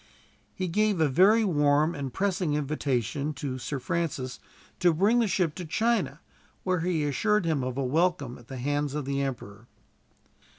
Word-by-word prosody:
He 185 - -2
gave 210 +1 +1
a 160 - +4
very 195 - +5
warm 150 -3 +3
and 140 -2 -4
pressing 185 -3 0
invitation 145 -1 -1
to 130 -2 -4
Sir 140 +3 -3
Francis 135 -3 -3 0.4
to 175 -2 +3
bring 210 +8 +3
the 230 - +2
ship 180 -5 +1
to 180 - -6
China, 230 +8 0 0.4
where 185 -1 +1
he 165 -2 0
assured 210 +8 +1
him 155 -5 0
of 130 0 -3
a 140 - 0
welcome 145 -2 0
at 120 - -17
the 135 - -7
hands 145 +2 -1
of 150 -2 -3
the 140 0 -1
emperor. 120 -5 -5
150 Hz, 170 wpm, -27 LUFS, 135-180 Hz, 0.4 s, very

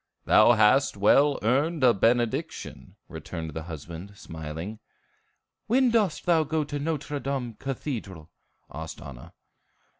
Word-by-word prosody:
"Thou 110 +3 +6
hast 110 +2 +3
well 140 +8 +4
earned 140 +7 +1
a 125 -2 +6
benediction," 115 +3 -1
returned 80 -1 -7
the 80 - -4
husband, 85 +5 -8
smiling. 80 +7 -7 0.9
"When 250 +2 +3
dost 210 -8 +1
thou 165 -2 +4
go 155 +1 -1
to 145 0 -5
Nôtre 145 -1 -3
Dame 135 -4 -3
Cathedral?" 110 - -5 0.4
asked - - -7
Anna. 65 -3 -11
120 Hz, 120 wpm, -26 LUFS, 95-145 Hz, 0.9 s, Thou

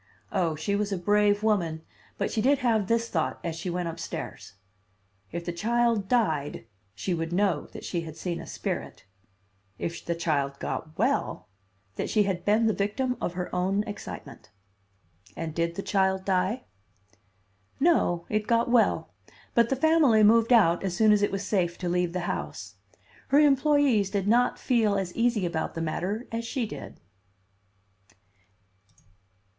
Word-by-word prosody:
Oh, 165 -3 0
she 200 +7 -1
was 205 0 -1
a 195 - 0
brave 205 +2 +2
woman, 170 -7 0 0.3
but - - -1
she 220 - 0
did 275 +5 +4
have 220 -5 +2
this 230 +1 +1
thought 160 -7 -1
as 170 -2 -3
she 180 - -4
went 175 0 -2
upstairs: 165 - -6 0.8
If 170 +1 -5
the 175 - -3
child 230 +2 +1
died 160 - 0 0.3
she 180 - -2
would 165 0 -3
know 185 -4 +1
that - - -10
she 170 - -2
had 160 -2 -9
seen 175 -2 -3
a - - -10
spirit; - - -5 0.7
if 170 - -4
the 170 - -2
child 145 -5 -1
got 155 +2 -5
well, - - 0 0.5
that - - -2
she 215 - +3
had 190 -3 -2
been 215 +2 +3
the 220 - +3
victim 250 +6 -1
of 175 - -2
her 180 0 -5
own 190 +3 +1
excitement. 210 -2 -9 0.9
And 165 -2 -4
did 170 +1 -1
the 195 - -4
child 190 -1 +1
die? 190 +6 0 1.2
"No, 220 - +2
it 215 0 -1
got 235 0 +2
well, 240 -2 +2 0.4
but 235 -1 +3
the 270 - +1
family 285 -6 +4
moved 230 +3 +5
out 195 -8 +5
as 180 -2 -2
soon 215 -1 +5
as 210 -1 +4
it 205 - +1
was 195 0 -3
safe 175 -4 0
to 180 - -4
leave 175 0 0
the 180 - -2
house. 175 - -4 0.5
Her 280 - +3
employees 285 -7 +4
did 200 -1 -1
not 240 +3 +3
feel 225 -5 +2
as 190 -3 -2
easy 230 -4 +1
about 170 -1 -3
the - - -3
matter 190 +8 -3
as 230 0 -3
she 240 +1 -2
did." 215 - -9
200 Hz, 165 wpm, -27 LUFS, 175-230 Hz, 1.2 s, moved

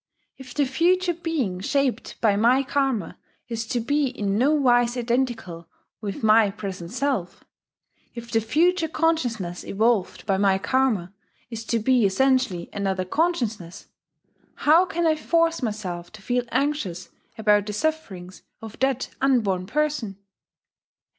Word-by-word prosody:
If 260 -2 -12
the 290 - +2
future 350 +6 +2
being 310 - -2
shaped 275 +6 -1
by 215 -3 +3
my 240 +6 +3
Karma 270 -9 -1 0.3
is 230 -2 -4
to 240 - -1
be 285 +4 +1
in 205 -6 -2
nowise 250 -2 +3
identical 235 -9 -2 0.3
with 205 0 -5
my 215 -1 +5
present 190 -4 -6
self, 250 -7 -2 0.7
if 235 0 -8
the 225 -1 +2
future 330 - +2
consciousness 245 - -1
evolved 215 -1 0
by 195 -3 +1
my 195 -1 +3
Karma 215 -5 0 0.4
is 230 -1 -5
to 230 - 0
be 245 +2 +2
essentially 255 -2 +1
another 190 -2 -1
consciousness, 225 - -2 0.7
how 330 +5 +4
can 345 -3 -1
I 315 -1 +3
force 330 +1 +1
myself 195 -7 -4
to 215 - -12
feel 245 +1 0
anxious 250 - -2 0.3
about 210 -1 +3
the 210 - -4
sufferings 205 - -3 0.2
of 225 -1 -10
that 265 -1 0
unborn 210 -9 +1
person? 275 -6 -1
235 Hz, 135 wpm, -24 LUFS, 200-280 Hz, 0.7 s, my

